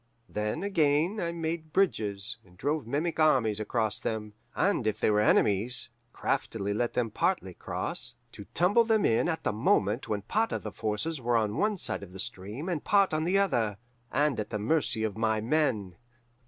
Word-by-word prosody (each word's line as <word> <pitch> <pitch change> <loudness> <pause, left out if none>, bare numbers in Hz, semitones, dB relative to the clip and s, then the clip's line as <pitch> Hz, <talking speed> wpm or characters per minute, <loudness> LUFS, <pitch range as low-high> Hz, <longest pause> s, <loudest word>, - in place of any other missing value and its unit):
Then, 105 - -2
again, 165 +1 +2
I 170 -3 -1
made 160 -1 -4
bridges, 105 - +1
and 90 -1 -21
drove 145 - -1
mimic 155 +7 -1
armies 125 -9 +3
across 110 -1 0
them; 105 -1 -3 0.2
and 190 - +1
if 110 - -1
they - - +3
were 105 0 +3
enemies, 105 +3 +2 0.2
craftily 100 -2 -2
let 120 +3 -1
them 115 -3 0
partly - - 0
cross, - - -4 0.2
to - - -10
tumble 200 +7 +4
them 220 -2 +2
in 115 +9 +2
at 160 - -2
the - - 0
moment 105 +1 +1
when 105 -2 -1
part 220 - 0
of - - -3
the - - -5
forces 120 +8 -2
were 120 0 +2
on 105 -2 0
one 210 - +1
side - - -2
of 95 -2 -10
the 95 - -9
stream 105 - -5
and 170 -5 -2
part 200 -4 +3
on 155 +1 0
the 185 +3 +2
other, 115 - +1 0.3
and 145 -4 +1
at 105 - -3
the 110 - -2
mercy 110 0 0
of 110 -1 -2
my 110 -1 +2
men. 110 - 0
120 Hz, 190 wpm, -29 LUFS, 105-165 Hz, 0.3 s, tumble